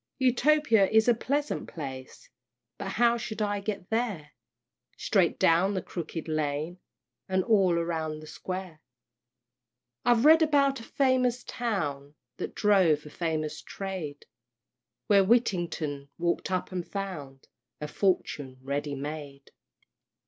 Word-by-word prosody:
Utopia 260 Hz, -4 st, +4 dB
is 220 Hz, +1 st, +4 dB
a 240 Hz, -, +6 dB
pleasant 285 Hz, +5 st, -2 dB
place, 130 Hz, -5 st, -8 dB, 0.5 s
But 195 Hz, -1 st, -4 dB
how 235 Hz, +1 st, +3 dB
shall 220 Hz, -2 st, -3 dB
I 205 Hz, 0 st, -1 dB
get 200 Hz, -2 st, -5 dB
there? 210 Hz, -10 st, -1 dB, 0.7 s
"Straight -, -, +2 dB
down 180 Hz, +5 st, +3 dB
the 190 Hz, -, -1 dB
Crooked 165 Hz, -1 st, -6 dB
Lane, 155 Hz, +2 st, -2 dB, 0.5 s
And 190 Hz, 0 st, +2 dB
all 195 Hz, -5 st, +3 dB
round 160 Hz, -2 st, -2 dB
the 155 Hz, -, -11 dB
Square." 185 Hz, 0 st, -6 dB, 1.2 s
I've 240 Hz, +1 st, +3 dB
read 320 Hz, +2 st, +8 dB
about 280 Hz, -3 st, +3 dB
a -, -, -9 dB
famous 255 Hz, -2 st, +1 dB
town 150 Hz, -, -3 dB, 0.2 s
That -, -, -5 dB
drove 185 Hz, -8 st, +3 dB
a 150 Hz, -, -10 dB
famous 155 Hz, -3 st, -2 dB
trade, 185 Hz, -7 st, -6 dB, 0.8 s
Where 200 Hz, -2 st, +5 dB
Whittington 175 Hz, -, 0 dB
walk'd 170 Hz, +2 st, -1 dB
up 185 Hz, 0 st, -2 dB
and 180 Hz, -1 st, -3 dB
found 155 Hz, -10 st, -6 dB, 0.3 s
A 150 Hz, -, -4 dB
fortune 150 Hz, -7 st, -1 dB
ready 140 Hz, +1 st, -2 dB
made. 140 Hz, -1 st, -7 dB
185 Hz, 125 wpm, -28 LUFS, 155-225 Hz, 1.2 s, read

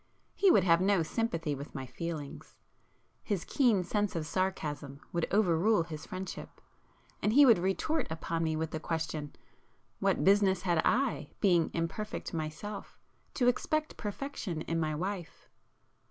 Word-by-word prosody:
He 395 Hz, -, +4 dB
would 200 Hz, -, +6 dB
have 170 Hz, -1 st, +4 dB
no 195 Hz, -2 st, +3 dB
sympathy 165 Hz, -5 st, -1 dB
with 140 Hz, +2 st, -8 dB
my 135 Hz, -2 st, -4 dB
feelings. 155 Hz, +1 st, -6 dB, 0.6 s
His 200 Hz, -6 st, -2 dB
keen 230 Hz, -9 st, +3 dB
sense 205 Hz, +2 st, -1 dB
of 160 Hz, -2 st, -2 dB
sarcasm 155 Hz, -6 st, -2 dB
would 170 Hz, -1 st, 0 dB
over 195 Hz, -4 st, +3 dB
rule 200 Hz, +2 st, +3 dB
his 160 Hz, -2 st, -8 dB
friendship, 185 Hz, 0 st, -7 dB, 0.6 s
and 210 Hz, -, +2 dB
he 285 Hz, +3 st, +8 dB
would 230 Hz, -8 st, +6 dB
retort 195 Hz, -, 0 dB
upon 165 Hz, +1 st, -2 dB
me 160 Hz, -1 st, 0 dB
with 160 Hz, 0 st, -2 dB
the 155 Hz, -, -3 dB
question—What 160 Hz, -2 st, -4 dB
business 195 Hz, -2 st, +4 dB
had 175 Hz, -3 st, +2 dB
I, 265 Hz, +1 st, +1 dB
being 175 Hz, -5 st, +3 dB
imperfect 170 Hz, +7 st, -3 dB
myself, 165 Hz, +6 st, -5 dB, 0.4 s
to 245 Hz, -, +2 dB
expect 310 Hz, +5 st, 0 dB
perfection 205 Hz, -, -4 dB
in 165 Hz, 0 st, -1 dB
my 155 Hz, -1 st, 0 dB
wife? 180 Hz, +1 st, -5 dB
175 Hz, 145 wpm, -31 LUFS, 160-210 Hz, 0.6 s, he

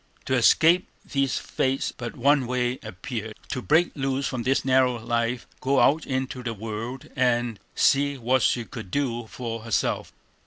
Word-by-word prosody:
To 130 Hz, -, -1 dB
escape 165 Hz, +8 st, +5 dB, 0.2 s
these 140 Hz, -2 st, 0 dB
fates 135 Hz, +1 st, -1 dB
but 120 Hz, -1 st, -6 dB
one 135 Hz, 0 st, +3 dB
way 125 Hz, 0 st, -1 dB
appeared; 110 Hz, +3 st, -6 dB, 0.2 s
to 125 Hz, -, -2 dB
break 160 Hz, +7 st, +3 dB
loose 135 Hz, -1 st, -1 dB
from 125 Hz, -, -3 dB
this 130 Hz, +3 st, +1 dB
narrow 130 Hz, -2 st, +3 dB
life, 115 Hz, +1 st, -1 dB
go 135 Hz, 0 st, +2 dB
out 155 Hz, +3 st, +3 dB
into 130 Hz, -1 st, -2 dB
the 115 Hz, -2 st, -4 dB
world 115 Hz, +4 st, -5 dB
and 120 Hz, -3 st, +1 dB, 0.2 s
see 140 Hz, 0 st, +3 dB
what 130 Hz, +1 st, +2 dB
she 120 Hz, -2 st, +2 dB
could 110 Hz, -5 st, -8 dB
do 120 Hz, -2 st, -1 dB
for 115 Hz, -1 st, -5 dB
herself. 115 Hz, 0 st, -1 dB
125 Hz, 160 wpm, -25 LUFS, 115-135 Hz, 0.2 s, escape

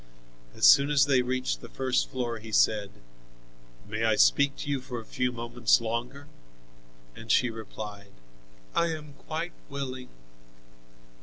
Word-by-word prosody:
As -, -, +2 dB
soon 140 Hz, +1 st, +7 dB
as 140 Hz, -2 st, +4 dB
they 135 Hz, -3 st, +3 dB
reached 125 Hz, -, -2 dB
the -, -, -10 dB
first 130 Hz, -1 st, 0 dB
floor 120 Hz, -3 st, -3 dB
he 110 Hz, +1 st, -10 dB
said: 105 Hz, -2 st, +3 dB, 1.0 s
"May -, -, -3 dB
I -, -, +3 dB
speak 135 Hz, -, +4 dB
to -, -, -7 dB
you 140 Hz, -2 st, -1 dB
for 125 Hz, -2 st, -6 dB
a 110 Hz, -, -10 dB
few 125 Hz, +2 st, -1 dB
moments 120 Hz, -1 st, +2 dB
longer?" 120 Hz, +5 st, -4 dB, 0.9 s
And 115 Hz, -1 st, -5 dB
she 125 Hz, +2 st, +3 dB
replied, 105 Hz, -2 st, -9 dB, 0.6 s
"I 170 Hz, -, +3 dB
am 155 Hz, -3 st, -6 dB
quite 160 Hz, +4 st, -5 dB, 0.2 s
willing." 130 Hz, -2 st, -5 dB
125 Hz, 145 wpm, -28 LUFS, 115-140 Hz, 1.0 s, soon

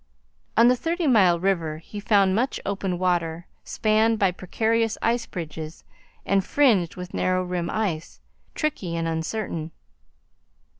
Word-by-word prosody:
On 230 Hz, -, +7 dB
the 250 Hz, -, +5 dB
Thirty 330 Hz, +6 st, -2 dB
Mile 190 Hz, -, +4 dB
river 170 Hz, -5 st, 0 dB
he 185 Hz, +6 st, -9 dB
found 200 Hz, -2 st, +3 dB
much 245 Hz, +6 st, 0 dB
open 195 Hz, -2 st, -2 dB
water, 175 Hz, -2 st, 0 dB, 0.2 s
spanned 220 Hz, +1 st, +2 dB
by 195 Hz, -3 st, +3 dB
precarious 220 Hz, +5 st, 0 dB
ice 230 Hz, 0 st, 0 dB
bridges 160 Hz, -2 st, -7 dB, 0.4 s
and 195 Hz, -1 st, +2 dB
fringed 215 Hz, -, +2 dB
with 180 Hz, 0 st, -8 dB
narrow 185 Hz, 0 st, +1 dB
rim 180 Hz, -1 st, -3 dB
ice, 185 Hz, -8 st, -3 dB, 0.4 s
tricky 195 Hz, -, -2 dB
and 165 Hz, 0 st, -1 dB
uncertain. 160 Hz, 0 st, -3 dB
190 Hz, 135 wpm, -24 LUFS, 170-220 Hz, 0.4 s, On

